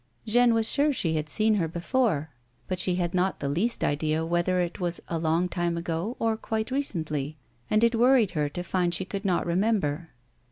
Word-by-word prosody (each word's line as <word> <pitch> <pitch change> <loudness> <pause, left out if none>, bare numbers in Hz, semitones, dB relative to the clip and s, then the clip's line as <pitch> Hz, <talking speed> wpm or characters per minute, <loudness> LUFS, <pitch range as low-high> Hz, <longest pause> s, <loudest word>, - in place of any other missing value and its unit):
Jeanne 235 +1 +4
was 225 -1 +2
sure 295 +1 +3
she 170 - -1
had 155 -1 -2
seen 215 +7 +3
her 185 -6 +1
before, 170 - 0 0.4
but 185 -1 -2
she 180 0 +1
had 175 -1 -1
not 185 +1 0
the 140 - -2
least 185 +12 0
idea 155 +2 0
whether 175 +2 +1
it 175 -1 -2
was 175 -1 -2
a 165 - -1
long 165 +2 +1
time 175 -1 -1
ago 170 +7 -3
or 225 -1 +1
quite 220 +1 -3
recently, 155 - -2 0.3
and 215 +1 +3
it 235 +1 +4
worried 240 -2 +4
her 150 -4 -1
to 175 +4 -5
find 180 -1 0
she 190 - -3
could 200 +1 -5
not 185 -4 +1
remember. 175 -4 0
180 Hz, 200 wpm, -27 LUFS, 165-220 Hz, 0.4 s, Jeanne